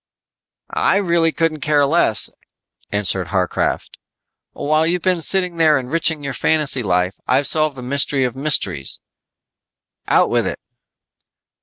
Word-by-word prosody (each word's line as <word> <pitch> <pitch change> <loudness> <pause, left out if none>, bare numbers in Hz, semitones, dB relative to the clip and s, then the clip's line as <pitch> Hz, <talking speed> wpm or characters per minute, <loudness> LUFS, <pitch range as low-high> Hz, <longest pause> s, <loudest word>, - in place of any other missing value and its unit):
"I - - +2
really 170 -4 +1
couldn't 165 -1 -1
care 150 -2 +2
less," 140 -8 +1 0.6
answered 95 -3 0
Harcraft. 90 -2 -2 0.5
"While 155 +2 0
you've 175 0 -1
been 185 -2 +1
sitting 180 0 +2
there 155 -3 +4
enriching 150 +3 -1
your 140 -1 -4
fantasy 145 +1 0
life, 90 -2 0
I've 135 +3 +2
solved 155 -1 +3
the 125 - -8
mystery 140 +1 0
of 125 -1 -2
mysteries." 105 - -1 1.1
"Out - - +2
with - - +1
it." - - -3
145 Hz, 130 wpm, -18 LUFS, 125-165 Hz, 1.1 s, there